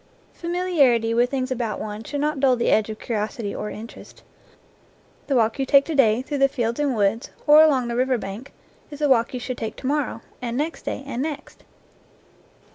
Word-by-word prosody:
Familiarity 320 -10 +1
with 240 +1 +2
things 260 -1 -2
about 235 -5 -2
one 210 +1 -6
should 285 +4 -4
not 300 -1 -1
dull 265 -2 +4
the 235 - 0
edge 215 0 +2
of 215 - -5
curiosity 215 -1 -3
or 210 - -4
interest. 220 +2 -11 1.0
The 275 - +1
walk 230 +2 +2
you 270 - +1
take 280 0 +5
to 325 - -3
day 245 -4 +3
through 285 +1 -4
the 275 - +5
fields 235 -2 -2
and 285 -4 +1
woods, 215 +3 0 0.2
or 300 +1 +8
along 275 -6 +3
the 235 - -3
river 255 +1 +1
bank, 215 +5 -7 0.4
is 290 - -9
the 295 0 +1
walk 235 -4 +3
you 250 - -4
should 250 0 -5
take 220 - -4
to - - -11
morrow, 280 -4 -1 0.2
and 240 -1 -3
next 310 +4 -3
day, - - -4
and 260 -3 -4
next. 300 0 -6
255 Hz, 200 wpm, -23 LUFS, 230-285 Hz, 1.0 s, or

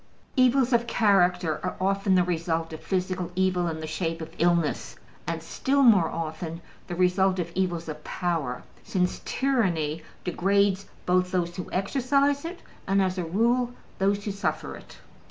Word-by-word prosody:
Evils 255 -1 +4
of 235 0 +3
character 180 -8 +3
are 180 - -3
often 195 +1 +2
the 180 - +5
result 165 -2 -1
of 160 - -7
physical 185 -2 -2
evil 185 -1 +1
in 160 -1 -3
the - - -4
shape 165 +1 -2
of 160 0 -8
illness, 170 -2 +1 0.3
and - - -3
still 280 +1 +1
more 200 -10 +6
often 165 0 -4 0.3
the 175 - -4
result 185 +1 +3
of 170 -2 -3
evils 175 -3 -1
of 155 -1 -6
power, 160 -8 -2 0.2
since 180 -1 -1
tyranny 175 - 0 0.2
degrades 195 +2 +1 0.2
both 180 0 +2
those 175 -2 -1
who 180 - -6
exercise 275 - +1
it 345 +2 -7 0.2
and 195 +1 +3
(as 185 -1 +1
a - - 0
rule) 235 +8 +1 0.3
those 200 +1 +1
who 205 - -1
suffer 200 +1 -2
it. - - -13
185 Hz, 160 wpm, -26 LUFS, 170-200 Hz, 0.3 s, more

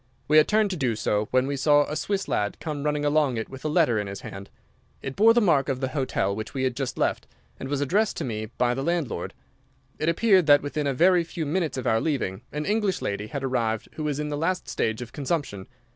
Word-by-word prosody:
We 155 - +5
had 155 - +6
turned 215 -1 +2
to - - -2
do 130 -8 0
so, 105 0 0
when 130 0 +2
we 140 +1 -2
saw 145 +2 +4
a 150 - -5
Swiss 200 +4 -2
lad 105 0 -1
come 150 -3 -4
running 150 0 -1
along 145 -4 +2
it 110 - -4
with 135 0 -10
a - - -1
letter 150 -8 +3
in 105 - -3
his 100 0 -7
hand. 100 0 -9 0.5
It 135 -1 -5
bore 225 +2 +6
the 240 - +5
mark 150 -9 +3
of 130 -2 -1
the 130 -1 -2
hotel 130 -7 -1
which 110 +5 -6
we 130 - -1
had 130 -2 0
just 130 -2 -3
left, - - -1 0.3
and 135 - -6
was 145 -1 -1
addressed 200 +10 +1
to - - -2
me 110 -3 -4
by 120 +2 0
the 135 - -3
landlord. 170 -2 -2 0.6
It 155 - +1
appeared 185 -1 +4
that 145 -1 +6
within 145 0 -2
a 140 - +1
very 175 +4 +4
few 165 -1 -5
minutes 155 -3 -1
of 130 - -4
our 115 -2 +2
leaving, 125 -11 -2
an 150 +1 -3
English 210 -3 0
lady 100 +1 -3
had 140 +4 -5
arrived 115 -4 -1
who 155 - -6
was 150 -1 -1
in 150 0 -2
the 145 - -2
last 180 +4 -1
stage 110 +2 -1
of 120 - -13
consumption. 140 - -3
145 Hz, 250 wpm, -25 LUFS, 125-160 Hz, 0.6 s, had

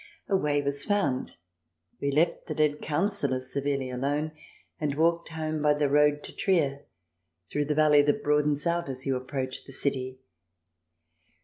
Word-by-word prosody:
A 195 - +1
way 145 -5 +1
was 140 0 -1
found. 150 -11 0 0.7
We 140 - 0
left 155 +5 +1
the 155 - -4
Dead 150 -1 +1
Councillor 155 -4 0
severely 135 0 -1
alone, 145 +5 -1 0.5
and 145 -2 -1
walked 170 +1 +2
home 155 -1 -3
by 150 0 +4
the 145 -1 +1
road 150 +1 +3
to - - -10
Trier, 145 -7 +1 0.6
through 145 - -1
the 150 +1 -1
valley 150 -1 +6
that 145 0 +1
broadens 150 0 +2
out 170 -2 0
as 130 0 -5
you 135 -1 +1
approach 130 0 -4
the 135 - -9
city. 130 -1 -1
145 Hz, 155 wpm, -28 LUFS, 140-155 Hz, 0.7 s, valley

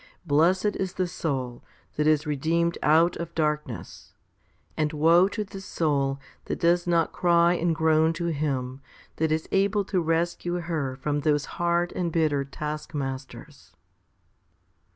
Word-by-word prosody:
Blessed 180 +7 +2
is 190 -1 -3
the 185 - -1
soul 135 -8 -4 0.3
that 150 0 +1
is 155 0 +3
redeemed 165 +4 0
out 165 +3 +4
of 170 -1 -6
dark 150 -1 0
ness, 115 - -10 0.6
and 155 -1 0
woe 165 +4 +5
to 210 +2 -3
the 195 -1 -9
soul 140 -7 -1 0.3
that - - -4
does 175 +1 +2
not 170 -2 +2
cry 170 -1 +3
and 170 -1 0
groan 160 0 +3
to 170 +1 -2
Him 135 -3 -2 0.4
that 160 0 0
is 160 0 -1
able 200 +1 +2
to 185 -2 0
rescue 170 +2 -1
her 155 -6 -3
from 145 +2 -2
those 145 -1 +1 0.2
hard 175 0 +1
and 175 -2 -1
bitter 155 -4 +1
taskmasters. 140 -2 -6
160 Hz, 145 wpm, -26 LUFS, 150-175 Hz, 0.6 s, woe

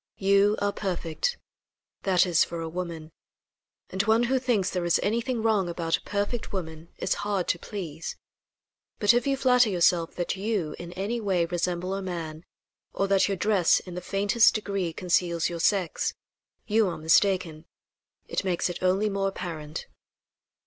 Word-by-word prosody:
You 200 +2 +3
are 205 0 +1
perfect 185 - -2 0.6
that 190 -2 +3
is, 175 -3 +4
for 170 - -5
a 165 - -4
woman; 165 -2 -5 0.8
and 190 - +1
one 220 +3 +3
who 260 +2 +2
thinks 235 -7 +1
there 180 -2 -2
is 175 0 +2
anything 230 +2 -1
wrong 210 -5 +2
about 165 -1 0
a - - -18
perfect 205 +3 -3
woman 160 -3 -6
is - - 0
hard 200 -3 -1
to 170 - +1
please. 170 -7 -6 0.8
But 205 +1 +4
if 240 +2 +1
you 275 -1 +1
flatter 250 -3 +4
yourself 175 -2 +2
that 175 +1 -2
you, 195 -6 -2
in 175 0 -7
any 205 +6 -2
way, 185 -5 +1
resemble 175 +1 -2
a 195 - -2
man, 165 -3 -5 0.5
or 195 - 0
that 195 -1 +4
your 195 -1 -1
dress 195 -3 +3
in 180 - -10
the 180 - -5
faintest 200 +5 +3
degree 200 -5 -2
conceals 175 -1 0
your 170 -1 -5
sex, 185 -1 +1 0.5
you 220 -1 +3
are 175 - -3
mistaken. 165 0 +2 0.6
It - - -2
makes 180 -1 0
it - - -8
only 185 +3 +2
more 195 -1 0
apparent." 165 -5 -5
185 Hz, 165 wpm, -27 LUFS, 170-205 Hz, 0.8 s, is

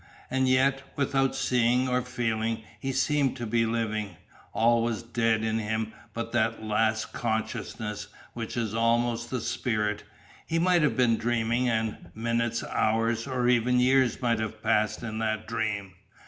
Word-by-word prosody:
And 130 0 +2
yet, 135 +1 +3
without 135 -1 +1
seeing 125 -1 +2
or 125 0 +1
feeling, 115 -2 -2 0.2
he 135 - -2
seemed 135 0 +1
to 120 - -4
be 115 +1 +1
living, 110 -4 -2 0.4
All 115 +1 +3
was 115 -1 -1
dead 115 -2 +1
in 110 0 0
him 110 0 -2 0.2
but 115 0 -4
that 115 -1 0
last 110 0 0
consciousness, 110 -1 -3 0.3
which 115 0 -5
is 110 -3 -1
almost 120 +1 +1
the 130 - -2
spirit; 105 -3 -1 0.4
he 165 - 0
might 175 0 +4
have 150 -3 +1
been 120 -3 +4
dreaming, 120 +1 +1
and 110 -2 -2
minutes, 115 +1 -1
hours, 115 +2 0
or 125 -2 0
even 125 0 +3
years 130 -1 +3
might 115 -2 +2
have 110 0 -4
passed 110 0 +1
in 110 -1 -4
that 110 -1 -1
dream. 105 -4 -2
115 Hz, 155 wpm, -27 LUFS, 110-125 Hz, 0.4 s, might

